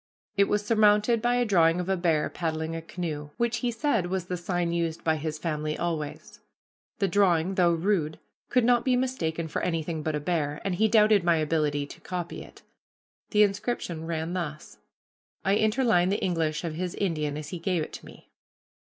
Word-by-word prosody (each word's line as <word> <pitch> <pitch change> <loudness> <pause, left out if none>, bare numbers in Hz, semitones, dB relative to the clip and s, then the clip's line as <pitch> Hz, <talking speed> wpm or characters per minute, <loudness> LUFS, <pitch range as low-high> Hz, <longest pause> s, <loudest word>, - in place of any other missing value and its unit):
It 200 0 +5
was 205 +1 0
surmounted 215 +1 +4
by 240 +1 +2
a 245 0 +2
drawing 170 -5 +4
of 180 - -3
a 190 - +2
bear 165 -4 +1
paddling 160 -1 -3
a 165 - -4
canoe, 160 -3 -5
which 235 0 0
he 245 - -1
said 230 - 0
was 185 -1 -2
the 180 - -3
sign 175 -1 -1
used 170 -1 -2
by 160 -1 +2
his 155 0 -4
family 155 -1 -2
always. 160 -4 -4 0.6
The 200 - +1
drawing, 185 -2 +2
though 175 -2 +3
rude, 165 -3 0 0.3
could 250 - +3
not 240 -1 +4
be 255 -1 +2
mistaken 170 -11 -1
for 150 - -3
anything 165 -2 -2
but 155 0 -2
a - - -1
bear, 150 -2 -1
and 195 - 0
he 215 +5 +3
doubted 215 -3 +5
my 170 -1 +4
ability 150 -2 0
to - - -12
copy 175 -2 -5
it. - - -16 0.7
The 210 -1 +5
inscription 195 -5 -2
ran 165 +1 -2
thus. 155 -4 -5 0.7
I 195 +1 +3
interline 215 -5 +3
the 200 - 0
English 165 -4 0
of 165 -2 -3
his 180 +2 -3
Indian 155 -6 -1
as 150 -1 -6
he 175 - -5
gave 170 -1 0
it - - -9
to - - -9
me. - - -16
175 Hz, 195 wpm, -27 LUFS, 160-205 Hz, 0.7 s, It